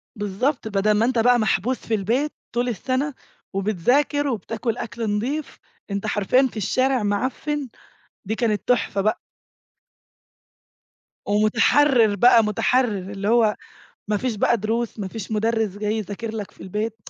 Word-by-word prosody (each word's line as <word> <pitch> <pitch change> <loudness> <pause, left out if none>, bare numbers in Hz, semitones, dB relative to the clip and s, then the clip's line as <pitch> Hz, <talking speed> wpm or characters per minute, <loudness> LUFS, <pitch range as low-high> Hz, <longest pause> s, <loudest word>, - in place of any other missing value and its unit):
بالضبط، 220 +6 -1
بدَل 205 0 +1
ما 210 +2 +3
أنت 245 -1 +1
بقى 245 +2 +4
محبوس 220 +3 +1
في 230 - -5
البيت 240 +9 0 0.2
طُول 240 +1 0
السَّنَة، 260 +6 -2 0.4
وبتذاكر 245 - +1
وبتاكل 225 -1 -3
أكْل 225 -2 -3
نضيف، 275 +8 -3 0.3
أنت 200 +2 -2
حرفيًا 220 +6 +2
في - - -10
الشارع 255 +4 +1
معفِّن، 260 +7 -2 0.6
دي 215 +3 -2
كانت 220 -3 -1
تُحفة 205 -5 +1
بقى. 215 +2 0 2.1
ومُتحرّر 225 +3 +3
بقى، 235 +2 +6
مُتحرّراللي 205 -3 0
هو 225 -2 +4 0.5
ما 210 - +1
فيش 245 +2 -2
بقى 235 - +3
دروس، 225 +2 -2
ما 200 -2 -3
فيش 215 +1 -7
مُدرِّس 220 -2 0
جاي 210 0 -1
يذاكر 215 +2 -5
لك 210 -3 -5
في - - -15
البيت 210 +4 -3
220 Hz, 135 wpm, -23 LUFS, 205-250 Hz, 2.1 s, بقى